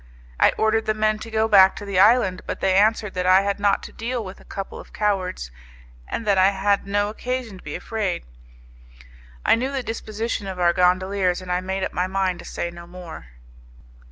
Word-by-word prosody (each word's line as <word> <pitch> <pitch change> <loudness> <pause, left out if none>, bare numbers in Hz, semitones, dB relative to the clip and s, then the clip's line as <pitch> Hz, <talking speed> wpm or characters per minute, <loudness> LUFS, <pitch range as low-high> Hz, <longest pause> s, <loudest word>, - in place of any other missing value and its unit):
I - - +6
ordered 220 0 +1
the 215 - +1
men 215 0 +1
to 225 - -8
go 220 0 +1
back 195 -3 +6
to 205 - -8
the 195 -2 0
island, 195 -3 +4
but - - -4
they 190 - +2
answered 210 +1 +2
that 180 0 -2
I 185 +1 +6
had 200 0 -2
not 200 0 +2
to - - -9
deal 235 0 -3
with 190 +1 -9
a - - -16
couple 195 -1 -7
of - - -13
cowards, 185 - -1 0.6
and 230 - -4
that 200 -2 +3
I 190 +1 +6
had 200 0 0
no 205 +1 +1
occasion 245 -3 -4
to - - -17
be - - -6
afraid. 205 -6 -3 1.2
I - - +5
knew 255 +4 0
the 270 -2 -2
disposition 225 -2 -4
of 190 -1 -6
our 175 -1 +4
gondoliers, 185 0 +2
and 185 -1 -7
I 180 0 0
made 190 +1 -3
up - - -3
my 180 +1 0
mind 190 -1 -1
to - - -10
say 170 - -4
no 170 0 -11
more. 175 - -10
195 Hz, 215 wpm, -23 LUFS, 185-215 Hz, 1.2 s, I